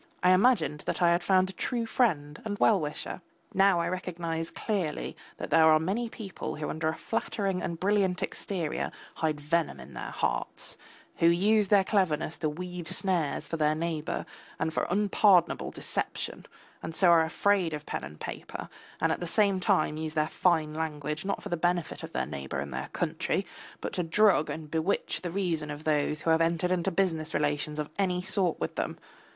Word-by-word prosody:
I 180 - +6
imagined 185 - +3
that - - -1
I 170 - +6
had 170 +1 +3
found 185 +1 +3
a - - -17
true 235 +5 -1
friend 160 - 0
and 205 -2 -3
well 210 -1 +4
wisher. 150 +3 -4 0.3
Now 195 -2 +4
I 170 - 0
recognise 170 -3 -3
clearly 190 -9 -2 0.2
that - - -6
there 160 -1 +6
are 155 - +7
many 205 +9 -1
people 205 -5 -6
who 150 0 -3
under 155 0 -2
a 160 - 0
flattering 195 -4 -2
and 165 -1 -3
brilliant 190 -2 +1
exterior 180 -5 -3 0.3
hide 155 -2 0
venom 160 +2 0
in 65 +2 -11
their - - -5
hearts, - - -1 0.4
who 165 - +4
use 200 +5 +4
their 200 -1 +5
cleverness 170 -6 0
to 155 - 0
weave 180 +2 -6
snares 180 -7 +1
for 165 - -3
their 155 -1 +2
neighbour 160 -1 -2 0.3
and 160 - -1
for - - 0
unpardonable 195 -2 +3
deception, - - -3 0.3
and 160 - -6
so 180 0 +5
are 165 -1 +6
afraid 185 +1 +2
of 150 -1 -5
pen - - -4
and 75 +1 -9
paper, - - -6 0.3
and - - +2
at - - -1
the 175 - -3
same 200 +1 +3
time 155 -3 +2
use 155 0 -3
their 155 0 +2
fine 160 -2 +1
language 150 0 -3
not 200 - -2
for - - -6
the 175 - 0
benefit 175 0 0
of - - -7
their - - -1
neighbour 70 -1 -5
and 70 -1 -5
their 65 +1 -4
country, - - -1 0.4
but - - -4
to - - 0
drug 180 0 +3
and 155 -2 -6
bewitch 165 +5 0
the 175 - -3
reason 170 -5 -1
of 145 +1 -6
those 150 0 +1
who 165 - +2
have 160 0 +4
entered 170 +2 +1
into 185 +1 +1
business 165 -4 0
relations 150 0 0
of 150 -1 -3
any 180 -2 +1
sort 185 -2 +1
with - - -2
them. - - -3
170 Hz, 190 wpm, -29 LUFS, 155-190 Hz, 0.4 s, are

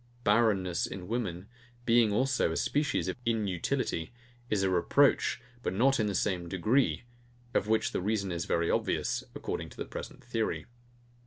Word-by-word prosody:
BARRENNESS 105 -6 +2
in 90 -2 -7
women, 100 -6 -3 0.4
being 115 -2 +4
also 130 -4 +2
a 80 - -2
species 145 0 0
of - - -1
INUTILITY, 100 -5 -1 0.4
is 100 -2 +1
a 95 - +2
reproach, 90 -2 +3 0.2
but 95 - -2
not 135 +6 +3
in 110 - +2
the 100 - -2
same 90 -3 0
degree: 110 +11 +2 0.5
of 100 - +1
which 110 0 +2
the - - -1
reason 100 -1 0
is 85 0 -2
very 85 0 +1
obvious, - - 0
according - - -4
to - - -15
the - - -4
present - - -8
theory. 115 -2 -2
105 Hz, 160 wpm, -30 LUFS, 90-115 Hz, 0.5 s, being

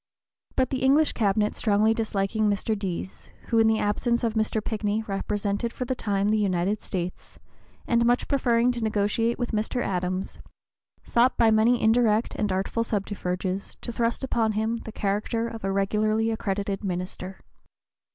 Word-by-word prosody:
But 260 - +1
the 265 - -1
English 285 +4 +4
Cabinet 210 -1 +1
strongly 215 0 +2
disliking 215 -1 0
Mr. 205 +2 0
Deas, 190 -2 -5 0.2
who 230 - +3
in 225 - +5
the 220 0 +3
absence 235 +4 0
of 230 -2 +1
Mr. 220 0 0
Pinckney 215 0 -2
represented 205 +2 -2
for 250 - -4
the 260 - -1
time 205 -4 0
the 215 0 +2
United 195 +1 0
States, 180 -2 -5 0.5
and 235 -1 +2
much 240 +1 +2
preferring 245 -3 +2
to 240 -1 -4
negotiate 220 +2 +1
with 245 -1 -3
Mr. 220 +3 -1
Adams, 185 0 -2 0.6
sought 240 +2 +2
by 230 -2 +5
many 225 +3 +4
indirect 225 0 +3
and 210 -2 -1
artful 195 +5 0
subterfuges 195 -3 -3
to - - -4
thrust 230 +2 -1
upon 225 -4 +1
him 220 +2 0
the 225 - -8
character 215 +3 -1
of 225 -2 -8
a 195 - 0
regularly 215 +3 +1
accredited 200 -2 -2
minister. 185 0 -4
215 Hz, 160 wpm, -26 LUFS, 200-230 Hz, 0.6 s, in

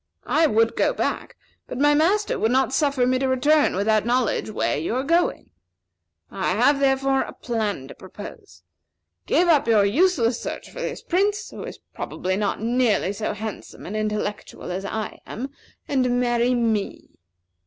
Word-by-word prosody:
I 320 +1 +3
would 225 -3 +2
go - - +2
back, - - -3 0.3
but - - -6
my 290 +2 +4
master 380 +8 +2
would 220 - +2
not 260 +1 +2
suffer 275 -2 +2
me 255 +1 +2
to 265 - 0
return 290 +2 +3
without 215 +2 +2
knowing 240 -2 0
where 205 - 0
you 160 +10 -2
are 260 - 0
going. 335 +5 0 0.8
I - - -1
have, 285 -1 +3
therefore, 270 0 +2
a - - -5
plan 210 - -3
to - - -10
propose. 205 - -12 0.6
Give 355 - +3
up 310 -7 +4
your 215 -3 +4
useless 250 - +2
search - - -6
for - - -7
this - - -4
Prince, 405 +3 0
who - - -8
is - - -8 0.2
probably 185 +1 -3
not 205 0 -1
nearly 230 -3 +1
so 215 +1 -3
handsome 215 0 -7
and 205 - -5
intellectual 210 -3 -3
as 190 +2 -4
I 215 +2 -4
am, 260 +5 -5 0.4
and 250 -3 +1
marry 240 0 +2
me. 225 -4 -1
245 Hz, 165 wpm, -23 LUFS, 215-280 Hz, 0.8 s, my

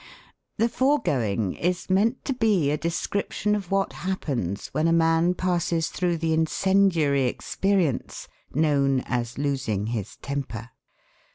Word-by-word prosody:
The 230 - +3
foregoing 125 - +1
is 180 +1 -2
meant 210 +7 +1
to 275 - 0
be 210 - +2
a - - +2
description 200 +4 -1
of 200 -4 -2
what 195 0 0
happens 135 - -3
when 155 +2 0
a - - +3
man 165 +1 +3
passes 170 -3 0
through 175 -2 -1
the 165 0 0
incendiary 160 -3 +2
experience 180 +3 -1 0.2
known 140 -3 +2
as 120 -1 -3
'losing 130 -8 -1
his 105 -3 -4
temper.' 125 -4 -5
165 Hz, 125 wpm, -25 LUFS, 135-190 Hz, 0.2 s, The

